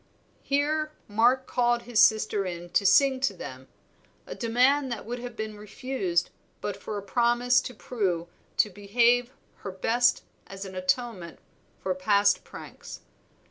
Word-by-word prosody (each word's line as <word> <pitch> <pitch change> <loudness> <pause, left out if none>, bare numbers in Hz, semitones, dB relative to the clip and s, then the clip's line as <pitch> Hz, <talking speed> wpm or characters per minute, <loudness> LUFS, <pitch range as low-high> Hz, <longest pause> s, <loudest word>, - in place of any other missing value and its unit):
Here 305 +2 0
Mark 240 +5 +3
called 240 -1 +1
his 235 -3 -1
sister 215 -2 +3
in 175 -1 -6
to 200 - +3
sing 270 +2 +5
to 255 -7 0
them, 130 -5 -9 0.6
a - - -7
demand 255 +4 +2
that 235 - -5
would 240 +2 -5
have 245 -1 -7
been 220 -1 -5
refused 205 -4 -2 0.3
but 205 - -3
for 205 +1 -6
a 200 - -5
promise 240 +4 +2
to 250 - -8
Prue 190 -8 -2 0.3
to 210 - +3
behave 235 +5 +2 0.3
her 195 - -7
best 240 +6 +2 0.2
as 195 0 -8
an 190 - -9
atonement 185 -1 -2 0.5
for 190 - 0
past 200 +2 +2
pranks. - - -11
220 Hz, 145 wpm, -27 LUFS, 195-245 Hz, 0.6 s, sing